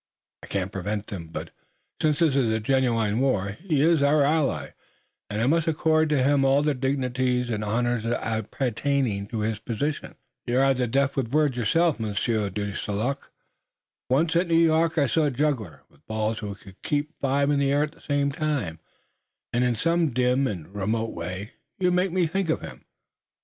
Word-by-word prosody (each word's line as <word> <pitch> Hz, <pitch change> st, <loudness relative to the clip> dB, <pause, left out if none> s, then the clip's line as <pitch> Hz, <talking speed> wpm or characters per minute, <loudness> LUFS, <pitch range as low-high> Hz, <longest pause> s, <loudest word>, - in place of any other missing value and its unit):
I -, -, -11 dB
couldn't 95 Hz, -1 st, -2 dB
prevent 100 Hz, +2 st, -3 dB
them, 90 Hz, -6 st, -7 dB
but, 80 Hz, -, -7 dB, 0.5 s
since 150 Hz, -2 st, +2 dB
there 165 Hz, 0 st, +4 dB
is 115 Hz, -6 st, +1 dB
genuine 115 Hz, -4 st, +1 dB
war, 105 Hz, -8 st, +1 dB
he 150 Hz, -, -1 dB
is 165 Hz, -2 st, +4 dB
our 145 Hz, +1 st, +4 dB
ally, 150 Hz, 0 st, 0 dB, 0.6 s
and 105 Hz, -, -3 dB
I 115 Hz, -, +2 dB
must 165 Hz, +4 st, +2 dB
accord 160 Hz, 0 st, +2 dB
to 145 Hz, -4 st, +2 dB
him 140 Hz, 0 st, +3 dB
all 135 Hz, +2 st, +4 dB
the 150 Hz, 0 st, +2 dB
dignities 125 Hz, -2 st, 0 dB
and 105 Hz, -1 st, -2 dB
honors 120 Hz, +2 st, 0 dB
appertaining 115 Hz, 0 st, -1 dB
to 110 Hz, 0 st, -3 dB
his 110 Hz, 0 st, -1 dB
position." 140 Hz, +7 st, -3 dB, 0.3 s
"You're 125 Hz, +2 st, +2 dB
rather 135 Hz, -2 st, +2 dB
deft 135 Hz, +3 st, +1 dB
with 130 Hz, -4 st, 0 dB
words 150 Hz, -3 st, +2 dB
yourself, 150 Hz, +6 st, +2 dB
Monsieur 105 Hz, 0 st, -1 dB
de 100 Hz, +1 st, -4 dB
St. 100 Hz, -1 st, -3 dB
Luc. 135 Hz, +6 st, -3 dB, 0.8 s
Once, 160 Hz, +6 st, +2 dB
at 175 Hz, +1 st, +3 dB
New 165 Hz, -, +2 dB
York, 165 Hz, 0 st, +3 dB
I 145 Hz, -, +4 dB
saw 150 Hz, +5 st, +2 dB
a -, -, +2 dB
juggler 125 Hz, -, -2 dB
with -, -, -27 dB
balls 110 Hz, 0 st, -1 dB
who 105 Hz, -2 st, -5 dB
could 95 Hz, 0 st, -16 dB
keep 150 Hz, +1 st, -1 dB
five 140 Hz, +1 st, +1 dB
in 145 Hz, -, +2 dB
the 140 Hz, -1 st, +2 dB
air 145 Hz, +1 st, +3 dB
at 150 Hz, -, -3 dB
the -, -, -22 dB
same 145 Hz, -1 st, 0 dB
time, 145 Hz, -, -2 dB, 0.7 s
and 120 Hz, +1 st, +2 dB
in 125 Hz, -1 st, +1 dB
some 165 Hz, +6 st, +1 dB
dim 125 Hz, +2 st, +2 dB
and 95 Hz, -4 st, -6 dB
remote 110 Hz, +3 st, -1 dB
way 90 Hz, +6 st, -6 dB, 0.3 s
you 180 Hz, -1 st, +2 dB
make 180 Hz, +1 st, +1 dB
me 180 Hz, 0 st, +2 dB
think 185 Hz, +2 st, -1 dB
of 160 Hz, -, 0 dB
him. -, -, -10 dB
130 Hz, 185 wpm, -25 LUFS, 110-150 Hz, 0.8 s, there